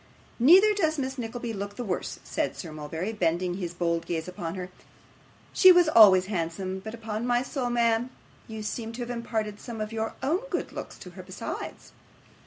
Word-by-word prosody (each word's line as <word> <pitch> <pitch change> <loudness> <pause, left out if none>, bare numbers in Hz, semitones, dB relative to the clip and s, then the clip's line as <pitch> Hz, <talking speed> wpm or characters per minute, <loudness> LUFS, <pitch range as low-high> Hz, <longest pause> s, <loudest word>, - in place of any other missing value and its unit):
'Neither 370 - +7
does 320 -6 +1
Miss 265 -1 -3
Nickleby 235 0 -4
look 200 0 -5
the 245 - -4
worse,' 190 -6 -3
said - - -2
Sir 165 - -7
Mulberry, 160 +7 -4
bending 175 -2 0
his 175 -3 -5
bold 170 -1 -1
gaze 165 -1 -2
upon 175 -1 -5
her. 185 -1 -6 0.8
'She 375 - +8
was 355 -2 +6
always 205 -9 +7
handsome, 185 0 -3
but 220 +4 -7
upon 225 0 -4
my 245 0 +2
soul, 260 -2 -3
ma'am, 235 0 +2 0.4
you 220 -1 -6
seem 225 +1 -4
to 240 - -6
have 240 - -5
imparted 220 -3 -3
some 235 -3 -7
of 215 +1 -4
your 220 0 -3
own 310 +7 +2
good - - -2
looks - - -7
to - - -11
her - - -10
besides. - - -7
220 Hz, 190 wpm, -27 LUFS, 185-245 Hz, 0.8 s, She